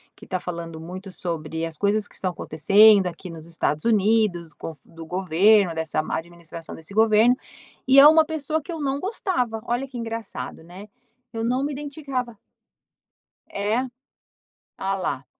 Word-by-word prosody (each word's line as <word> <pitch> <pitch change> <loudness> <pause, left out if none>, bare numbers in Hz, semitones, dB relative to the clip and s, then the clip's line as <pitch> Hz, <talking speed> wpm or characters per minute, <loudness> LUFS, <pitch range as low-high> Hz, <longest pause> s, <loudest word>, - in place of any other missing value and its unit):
que - - -14
tá 185 - -2
falando 170 -2 -6
muito 185 +4 -8
sobre 165 -2 -4
as 165 -2 -5
coisas 205 +2 +1
que - - -20
estão 185 -1 -1
acontecendo 195 +5 +5
aqui 180 +1 -7
nos 160 -1 -10
Estados 155 -2 -1
Unidos, 210 -6 +2
com - - -7
o 160 - -16
do 165 -1 -11
governo, 185 +2 +3
dessa 160 -1 -1
má - - -3
administração 170 0 -9
desse 160 +5 -8
governo. 220 +3 +5 0.5
E 270 +1 +7
é 285 - +10
uma 315 +1 +7
pessoa 315 0 -2
que 340 - -9
eu 325 - -5
não 275 -1 -1
gostava. 315 - -2
Olha 245 +3 -1
que 260 - -9
engraçado, 225 -7 -6
né? 185 +5 -11 0.5
Eu 225 0 -3
não 250 +3 0
me 290 - -3
identificava. 275 -5 -5 1.1
É? 210 +4 0 1.0
Ah 195 0 -1
lá. 160 -8 -3
205 Hz, 165 wpm, -24 LUFS, 170-245 Hz, 1.1 s, é